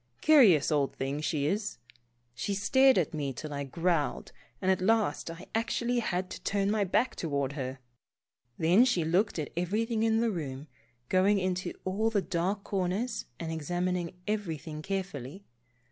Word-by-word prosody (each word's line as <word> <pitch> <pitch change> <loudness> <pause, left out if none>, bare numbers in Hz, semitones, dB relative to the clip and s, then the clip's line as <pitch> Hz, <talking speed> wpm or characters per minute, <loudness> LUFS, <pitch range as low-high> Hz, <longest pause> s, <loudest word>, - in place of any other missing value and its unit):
Curious 220 - +6
old 145 -2 +1
thing 135 +2 -3
she 150 -2 0
is. 205 +6 -1 0.6
She 160 - -2
stared 260 +6 +4
at 170 -5 +1
me 145 -3 -2
till 150 +4 -6
I 140 0 -3
growled, 165 +2 -1 0.3
and 190 - +2
at 185 - +1
last 210 -6 +1
I 165 +2 -8
actually 235 +2 0
had 185 -4 -2
to - - -7
turn 200 0 0
my 215 -1 +2
back 235 +7 +1
toward 140 -4 -2
her. 130 -2 -4 0.8
Then 175 +8 +5
she 215 -11 +2
looked 180 +6 +1
at 150 -3 -3
everything 215 +6 0
in 225 0 +3
the 230 -1 +2
room, 145 -6 -5 0.4
going 190 +5 +3
into 185 -1 -1
all 205 +4 +1
the 220 -2 +1
dark 185 +3 -1
corners 200 +5 -2
and 165 -1 -4
examining 175 +2 -2
everything 165 -7 -3
carefully. 190 -3 -5
185 Hz, 160 wpm, -30 LUFS, 155-210 Hz, 0.8 s, Curious